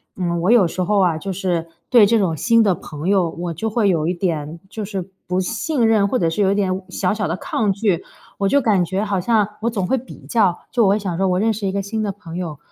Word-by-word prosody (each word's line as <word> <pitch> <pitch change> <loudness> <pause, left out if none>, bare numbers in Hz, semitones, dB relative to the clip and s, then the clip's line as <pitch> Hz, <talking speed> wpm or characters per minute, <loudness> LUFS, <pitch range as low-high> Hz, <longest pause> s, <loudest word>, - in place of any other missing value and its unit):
嗯， 170 -2 -1
我 180 - +1
有 225 -8 +5
时 185 - -4
候 210 +3 +1
啊， 170 -4 +2
就 195 +3 -4
是 175 -3 -2 0.2
对 235 -5 +7
这 230 +2 +3
种 185 -6 +1
新 230 +8 +3
的 200 -3 +3
朋 155 0 -6
友， 190 -4 +3
我 170 +1 -5
就 220 +8 -3
会 215 -1 +1
有 160 -4 +1
一 175 - +1
点 165 -3 -3
就 220 - -5
是 195 -3 -5 0.2
不 180 +1 0
信 230 - 0
任， 215 -3 +3
或 250 +5 0
者 170 - +1
是 165 +5 -1
有 195 -1 +3
一 200 - +1
点 190 -2 +1
委 190 - -7
小 185 0 0
小 210 -2 -2
的 165 - -1
抗 210 +2 -1
拒。 195 -3 0 0.4
我 195 -1 +1
就 280 - +4
感 205 -6 +3
觉 190 +5 -2
好 195 -3 -1
像 215 +1 +2
我 235 - +1
总 205 -5 -2
会 235 - +1
比 255 - -13
较， 200 -7 +2
就 240 - +2
我 - - +4
会 200 - +3
想 195 -5 -3
说， 195 - +2
我 180 0 +1
认 220 +2 +2
识 200 -2 -3
一 - - 0
个 200 - -2
新 220 +3 -3
的 205 -2 -1
朋 180 -4 -10
友， 165 -5 -4
195 Hz, 295 characters per minute, -20 LUFS, 175-215 Hz, 0.4 s, 对